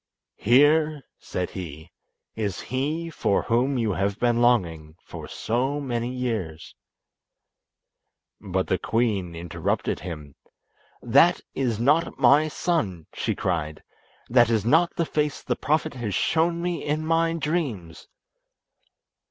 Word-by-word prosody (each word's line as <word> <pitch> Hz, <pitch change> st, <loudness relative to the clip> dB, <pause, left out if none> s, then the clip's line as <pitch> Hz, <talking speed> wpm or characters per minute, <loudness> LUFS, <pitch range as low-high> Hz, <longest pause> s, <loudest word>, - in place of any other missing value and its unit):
"Here," 145 Hz, +4 st, +4 dB, 0.2 s
said 90 Hz, -, -4 dB
he, 80 Hz, -5 st, -8 dB, 0.4 s
"is 105 Hz, -5 st, -3 dB
he 155 Hz, +6 st, -3 dB
for 100 Hz, -, 0 dB
whom 125 Hz, +4 st, +1 dB
you 115 Hz, -3 st, 0 dB
have 100 Hz, +2 st, -1 dB
been 120 Hz, -1 st, +2 dB
longing 85 Hz, -11 st, +1 dB, 0.3 s
so 130 Hz, +6 st, -1 dB
many 120 Hz, -4 st, -2 dB
years." 110 Hz, -11 st, -4 dB, 1.7 s
But 95 Hz, -1 st, -2 dB
the 95 Hz, -, 0 dB
queen 100 Hz, -7 st, -1 dB
interrupted 85 Hz, -1 st, -2 dB
him, 75 Hz, -6 st, -8 dB, 0.7 s
"That -, -, +4 dB
is 120 Hz, -5 st, -1 dB
not 150 Hz, +7 st, +2 dB
my 150 Hz, +3 st, +5 dB
son!" 110 Hz, -, -2 dB
she -, -, -2 dB
cried. 80 Hz, -4 st, -2 dB, 0.4 s
"That 120 Hz, -1 st, +4 dB
is 110 Hz, -3 st, +1 dB
not 165 Hz, +7 st, +3 dB
the 170 Hz, -, 0 dB
face 150 Hz, -2 st, -2 dB
the -, -, -1 dB
Prophet 155 Hz, +2 st, 0 dB
has 115 Hz, -7 st, -4 dB
shown 170 Hz, -, +1 dB
me 175 Hz, -1 st, -2 dB
in 155 Hz, +1 st, -1 dB
my 165 Hz, +1 st, +2 dB
dreams!" 150 Hz, -, -3 dB
120 Hz, 120 wpm, -25 LUFS, 95-150 Hz, 1.7 s, my